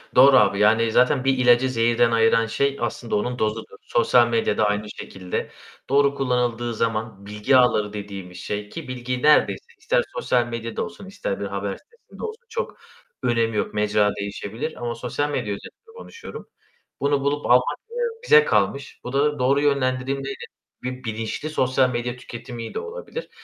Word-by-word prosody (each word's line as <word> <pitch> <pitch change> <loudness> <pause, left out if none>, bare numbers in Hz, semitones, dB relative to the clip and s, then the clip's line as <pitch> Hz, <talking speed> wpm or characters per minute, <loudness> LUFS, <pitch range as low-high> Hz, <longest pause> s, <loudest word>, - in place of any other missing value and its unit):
Doğru, 130 +1 +8
abi, 100 -5 +4
yani, 110 +2 +4
zaten 125 +2 +3
bir 135 0 +3
ilacı 125 +1 +4
zehirden 115 -1 +2
ayıran 115 0 +4
şey, 140 +5 0
aslında 120 -1 -2
onun 125 +4 -1
dozudur. 110 -2 -2
Sosyal 120 +1 +3
medya 115 -3 0
da 110 - +3
aynı 105 0 -1
şekilde, 95 -3 -5 0.4
doğru 140 +1 +3
kullanıldığı 120 -3 0
zaman 110 -2 -2
bilgi 105 +6 +2
ağları 105 -4 +3
dediğimiz 100 -3 -7
şey 105 +3 -4
ki 165 +3 -8
bilgi 125 0 -4
neredeyse 150 0 +4
ister - - +1
sosyal 125 - +1
medyada 115 -1 -4
olsun 210 -2 -9
ister 190 - -4
bir 100 - -3
haber 100 0 -3
sitesinde 470 +1 -16
olsun 450 +2 -6
çok 475 +2 -4 0.5
önemi 115 -3 +1
yok; - - -1
mecra 105 0 +2
değişebilir 100 +8 -5
ama 120 -1 -2
sosyal 125 +5 -2
medya 105 -8 -2
özelinde 450 - -12
konuşuyorum, 465 - -10 0.5
bunu 140 0 +1
bulup 145 +1 -1
almak, 125 +1 +3
eee, 475 - -8 0.3
bize 455 -1 +6
kalmış, 140 - 0
bu 125 - -6
da 145 +1 +1
doğru 135 +3 +3
yönlendirilmeyle 135 -1 -1 0.4
bir 125 0 -5
bilinçli 115 +6 -4
sosyal 130 -3 +2
medya 120 0 -3
tüketimiyle 120 -1 -7
olabilir. 480 +1 -7
120 Hz, 160 wpm, -23 LUFS, 110-140 Hz, 0.5 s, Doğru